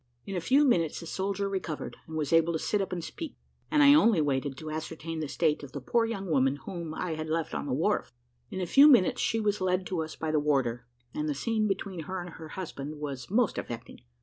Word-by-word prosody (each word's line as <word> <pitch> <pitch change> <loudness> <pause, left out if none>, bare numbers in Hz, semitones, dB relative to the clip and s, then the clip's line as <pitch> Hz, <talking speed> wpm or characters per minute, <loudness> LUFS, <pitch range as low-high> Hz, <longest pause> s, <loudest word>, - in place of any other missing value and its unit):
In 195 - -5
a 175 - -1
few 275 - +4
minutes 170 - +2
the 170 - -8
soldier 195 +3 -2
recovered, 185 -6 -4
and 160 - -7
was 150 0 -1
able 165 +1 +4
to - - +1
sit 205 +5 0
up 195 - -3
and 175 -2 -3
speak, 325 - -7 0.3
and 300 -1 +4
I 285 0 +9
only 230 - +5
waited 140 -2 0
to 155 +1 -6
ascertain 160 +1 -5
the 155 - -2
state 155 +1 +1
of 140 -2 -10
the 140 - -4
poor 230 - +1
young 200 -4 -4
woman 135 -5 +2
whom 160 +2 -6
I 180 - -3
had 155 0 -4
left 160 0 -1
on - - -3
the 130 - -1
wharf. 170 +10 0 0.4
In 190 - -5
a 185 - -1
few 275 - +7
minutes 245 -11 +5
she 225 - +1
was 210 -2 0
led 185 0 +1
to 180 -3 -2
us 160 0 -5
by 160 -1 -2
the 155 - +3
warder, 130 -5 0 0.3
and 150 0 -2
the 145 - -1
scene 215 +8 0
between 195 -2 -3
her 190 0 -4
and 175 -1 -7
her 160 0 -9
husband 155 -4 -6
was 140 -4 -5
most 225 +2 +2
affecting. 115 -1 -7
165 Hz, 245 wpm, -29 LUFS, 150-195 Hz, 0.4 s, I